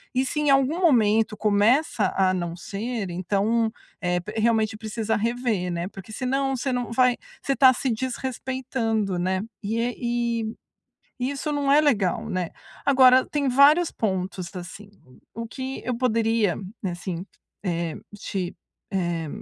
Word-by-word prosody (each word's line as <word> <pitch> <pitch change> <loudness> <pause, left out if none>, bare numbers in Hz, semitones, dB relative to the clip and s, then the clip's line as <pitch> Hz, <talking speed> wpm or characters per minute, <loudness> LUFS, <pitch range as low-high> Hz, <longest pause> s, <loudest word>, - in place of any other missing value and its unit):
e 260 +1 +2
se 300 - -2
em 295 - +2
algum 275 +4 +3
momento 225 - +3
começa 215 +8 +2
a 190 -1 +3
não 175 -2 -3
ser, 210 +3 -4
então, 205 +6 +1 0.3
é, 180 -1 +1
p 210 +5 -8
realmente 220 -1 +2
precisa 220 0 -2
rever, 225 -5 -1
né, 170 +1 -2
porque 195 +1 -11
senão 270 +3 0
você 260 +2 -2
não 245 -2 -2
vai 250 +1 +3 0.2
você 275 - 0
está 265 -1 +7
se 255 +1 -1
desrespeitando, 245 -4 -2
né, 185 +1 0 0.2
e 235 0 -1 0.7
e 250 +2 0
isso 285 +2 -3
não 285 -1 0
é 295 - +7
legal, 215 - +1
né. 180 -2 -2 0.3
Agora, 260 -2 +6
tem 285 -2 -1
vários 290 +6 +5
pontos, 190 -3 -3
assim. 190 +3 -9 0.4
O 230 +1 -5
que 260 +3 -5
eu 250 -2 -1
poderia, 225 -5 +1 0.3
assim, 175 -1 -4 0.4
é, 170 -3 -2 0.2
te, 190 -3 -4 0.4
é 170 -4 -1
225 Hz, 140 wpm, -25 LUFS, 190-255 Hz, 0.7 s, está